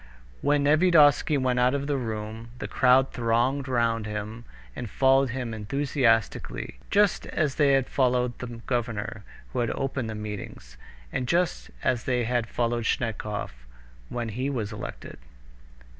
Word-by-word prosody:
When 145 0 +2
Nevyedovsky 150 -1 +5
went 130 -2 +1
out 125 +2 +3
of 140 0 -2
the 145 0 0
room, 110 -2 -4
the - - -5
crowd 130 +1 +4
thronged 125 +4 +1
round 115 -3 +1
him 105 +2 -5 0.3
and 120 - -5
followed 135 +2 +3
him 120 -1 -4
enthusiastically, 115 - 0
just 205 -2 +2
as 150 -4 0
they 140 -1 +3
had 135 -2 +2
followed 125 -2 +1
the 125 - -5 0.2
governor 115 -3 -2 0.3
who 130 - -1
had 120 -1 +1
opened 135 -4 -2
the 110 - -4
meetings, 105 - -7 0.4
and 125 - -1
just 175 +3 0
as 125 -2 0
they 125 -2 +1
had 120 0 0
followed 120 -1 -1
Snetkov 110 -3 -2 0.6
when 120 -2 -3
he 130 +6 -2
was 115 -6 -3
elected. 105 - -8
125 Hz, 145 wpm, -26 LUFS, 115-135 Hz, 0.6 s, Nevyedovsky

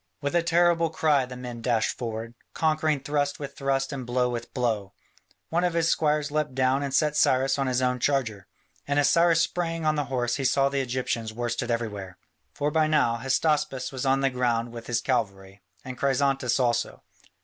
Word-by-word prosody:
With 140 +1 -3
a 175 - +3
terrible 170 0 +3
cry 150 -4 +2
the 125 0 -8
men 120 -2 -7
dashed 115 -2 0
forward, 115 -1 -5 0.2
conquering 155 -2 +1
thrust 145 0 -1
with 140 -2 -7
thrust 135 0 -1
and 135 -2 -4
blow 125 +1 0
with 120 -1 -5
blow. 110 -6 -2 0.6
One 170 +2 +1
of 175 -2 0
his 165 -1 +2
squires 150 -2 +1
leapt 150 -3 -1
down 130 +1 +2
and 140 -1 -3
set 150 +2 +2
Cyrus 135 -1 +2
on 135 - 0
his 130 0 0
own 125 0 +1
charger. 115 -8 -1 0.4
And 140 0 0
as 145 -1 +4
Cyrus 170 -1 +4
sprang 165 -1 -2
on 155 - +3
the 145 -1 -1
horse 120 -2 -1
he 140 - -3
saw 135 +1 +3
the 140 0 -1
Egyptians 120 -3 -3
worsted 120 +1 -3
everywhere. 105 -6 -3 0.3
For 145 +1 -2
by 155 0 +2
now 135 -7 +2
Hystaspas 135 +1 0
was 130 -2 -5
on 135 0 +2
the 135 -1 +2
ground 120 -2 0
with 115 -1 -9
his 120 -1 0
cavalry, 100 -6 -2 0.2
and 130 -1 -7
Chrysantas 135 -2 +1
also. 120 -2 0
135 Hz, 195 wpm, -26 LUFS, 120-150 Hz, 0.6 s, as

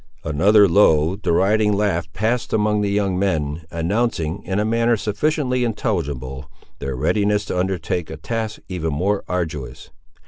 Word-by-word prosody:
Another 100 +7 +4
low, 85 -3 +4
deriding 105 +3 +2
laugh 95 -5 0
passed 115 +6 -1
among 105 -1 +2
the 100 - 0
young 100 -2 0
men, 80 -5 -1
announcing, 85 0 -1
in 95 - -2
a 105 - +1
manner 115 +1 +2
sufficiently 125 +5 0
intelligible, 70 - -3 0.3
their 70 -2 -4
readiness 105 +9 +1
to 90 - -2
undertake 90 -2 -2
a - - -6
task 115 -2 -4
even 85 -4 -3
more 100 +7 0
arduous. 75 -8 -4
100 Hz, 140 wpm, -21 LUFS, 80-105 Hz, 0.3 s, Another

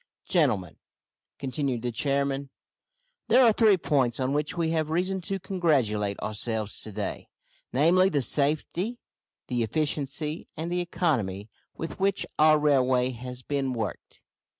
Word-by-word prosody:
"Gentlemen," 110 - +1 0.6
continued 130 -3 -2
the 120 - -1
chairman, 140 +2 0 0.8
"there 245 +3 +6
are 225 - +6
three 210 -3 +5
points 135 -7 +1
on 130 +1 0
which 150 +4 -1
we 165 -1 +1
have 160 -2 0
reason 185 +4 0
to 195 +2 -2
congratulate 130 - 0
ourselves 110 0 -2
to 110 - -6
day, - - -4 0.4
namely, 175 +8 +4
the 145 -7 0
safety, 155 - 0 0.5
the 125 -1 -1
efficiency, 150 +4 -1
and 165 +2 -3
the 180 0 0
economy 115 - -1 0.3
with 165 - -6
which 195 0 +1
our 155 0 +6
railway 130 -4 +3
has 125 +1 -8
been 135 -2 -1
worked. 110 -4 -6
140 Hz, 135 wpm, -27 LUFS, 125-170 Hz, 0.8 s, there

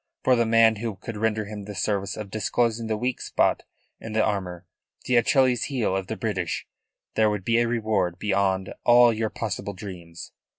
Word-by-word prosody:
For 130 - +4
the 115 -1 +2
man 115 -1 +5
who 110 -1 -4
could 115 +3 -8
render 110 0 0
him 105 -1 -7
the 105 0 -8
service 100 +1 -1
of 105 -3 -7
disclosing 115 +1 0
the 110 -1 -1
weak 125 +3 -2
spot - - +1 0.4
in 110 - -7
this 110 0 +3
armour, 95 -4 -2 0.4
the 125 - +1
Achilles 125 0 +3
heel 120 -9 -1
of 95 -1 -2
the 110 - -4
British, 95 -8 -2 0.5
there 110 -1 +3
would 105 -3 -3
be 115 0 +3
a 120 - +2
reward 105 -7 0
beyond 95 -1 0
all 120 -1 +6
your 110 0 -1
possible 100 -2 -4
dreams. 90 -3 -9
110 Hz, 185 wpm, -25 LUFS, 100-115 Hz, 0.5 s, all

